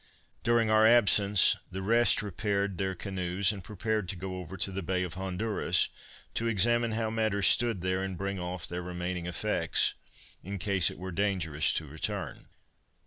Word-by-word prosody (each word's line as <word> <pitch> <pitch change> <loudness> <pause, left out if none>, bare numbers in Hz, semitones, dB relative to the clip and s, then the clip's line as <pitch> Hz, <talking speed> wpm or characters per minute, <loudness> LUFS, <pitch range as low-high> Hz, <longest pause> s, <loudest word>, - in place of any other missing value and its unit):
During 115 -2 +2
our 110 0 +6
absence 105 -4 +5 0.2
the 95 +1 -5
rest 115 +1 +4
repaired 100 -1 -2
their 95 -1 -1
canoes, 95 0 0
and 100 -3 -8
prepared 105 0 -3
to - - -1
go 95 +1 -6
over 90 +1 -8
to 95 +2 0
the 95 +1 -4
Bay 90 +1 -1
of 90 -2 -5
Honduras, 95 +4 0 0.4
to 115 - -1
examine 115 +2 +2
how 110 0 -1
matters 110 -3 0
stood 115 +1 +3
there, 95 +1 -1
and 95 -2 -4
bring 100 0 -3
off 90 -1 -4
their 90 +1 -4
remaining 90 0 -4
effects, 90 - 0 0.5
in 100 +2 -5
case 95 -1 +2
it - - -10
were 95 +1 -6
dangerous 85 -5 0
to 80 - -1
return. 75 0 -5
95 Hz, 170 wpm, -29 LUFS, 90-110 Hz, 0.5 s, our